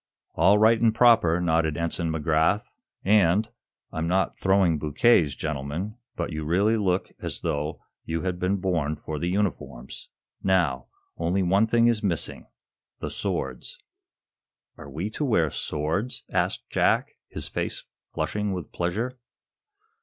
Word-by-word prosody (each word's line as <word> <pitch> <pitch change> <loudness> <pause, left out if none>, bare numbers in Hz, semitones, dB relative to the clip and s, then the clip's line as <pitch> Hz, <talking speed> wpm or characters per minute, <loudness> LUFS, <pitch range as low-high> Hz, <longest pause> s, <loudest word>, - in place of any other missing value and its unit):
"All 100 +1 +5
right 110 +2 +4
and 115 -2 +3
proper," 115 -9 +5
nodded 80 -3 +1
Ensign 85 0 -1
McGrath. 80 +5 +2 0.4
"And 100 +1 +4 0.4
I'm 80 +1 -2
not 95 +2 +1
throwing 95 -5 +3
bouquets, 75 - +3
gentlemen, 80 +7 -4 0.2
but 85 0 -3
you 80 -1 -4
really 95 +8 +2
look 95 -4 0
as - - -4
though 75 +2 -3 0.2
you 80 0 -3
had 90 -1 -2
been 90 +2 +1
born 85 -6 -1
for 75 0 -6
the 85 - -2
uniforms. 70 -10 -3 0.3
Now, 85 -9 +1 0.3
only 90 +3 0
one 100 +5 +3
thing 115 +1 +3
is 115 -2 +3
missing 90 -6 -2 0.5
the - - -4
swords." 65 -2 -4 1.0
"Are 70 - -11
we 85 +10 -4
to 150 - -3
wear 85 - +2
swords?" 80 +11 -2
asked - - -1
Jack, - - +2 0.2
his - - -5
face - - -4 0.3
flushing 105 -1 -1
with 90 -5 -6
pleasure. 110 +9 -2
90 Hz, 140 wpm, -26 LUFS, 80-105 Hz, 1.0 s, All